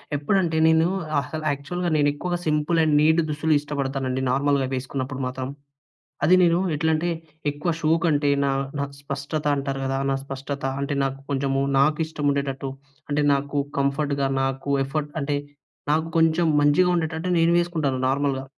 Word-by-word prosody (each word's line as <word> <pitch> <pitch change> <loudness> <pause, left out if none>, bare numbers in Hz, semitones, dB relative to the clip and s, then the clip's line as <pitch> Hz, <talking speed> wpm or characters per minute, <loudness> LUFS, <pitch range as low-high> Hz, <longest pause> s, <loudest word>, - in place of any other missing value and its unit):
ఎప్పుడంటే, 165 +2 +1
నేను 160 +1 +4 0.3
అసలు 155 +3 -5
యాక్చువల్‌గా, 175 +6 -3
నేను 145 -1 +3
ఎక్కువగా 175 +4 -3
సింపుల్ 155 +2 +1
అండ్ 155 -2 +2
నీట్ 160 +2 +4
దుస్తులు 155 +1 +1
ఇష్టపడతానండి, 135 -2 -2
నార్మల్‍గా 140 -1 +1
వేసుకున్నప్పుడు 130 +1 -4
మాత్రం. 130 0 -4 0.8
అది 175 +5 +6
నేను 170 0 +4 0.2
ఎట్లంటే, 160 +2 +1 0.4
ఎక్కువ 150 +4 -2
షో 155 0 +1
కంటే, 145 -3 +2
నా 140 - +2 0.3
నాకు 140 0 -4
స్పష్టత 140 +2 -4
అంటారు 135 0 -3
గదా! 135 0 -1
నా - - +1
స్పష్టత 140 +1 -6 0.2
అంటే, 140 0 -2
నాకు 135 0 -3
కొంచెము 135 0 0 0.2
నాకు 150 +2 +3
ఇష్టం 155 -2 -4
ఉండేటట్టు, 140 -1 -3 0.4
అంటే 145 +1 +1
నాకు 140 +1 -3 0.2
కంఫర్ట్‌గా, 140 0 0
నాకు 135 +1 -2
ఎఫర్ట్ 145 +2 -3
అంటే, 145 0 -1 0.6
నాకు 160 +1 +1
కొంచెం 165 +1 +3 0.2
మంచిగా 180 +5 +4
ఉండేటట్టు 160 +2 -2
నేను 165 +1 +4
వేసుకుంటాను 155 -6 -1
నార్మల్‍గా. 135 -1 0
145 Hz, 150 wpm, -24 LUFS, 135-160 Hz, 0.8 s, అది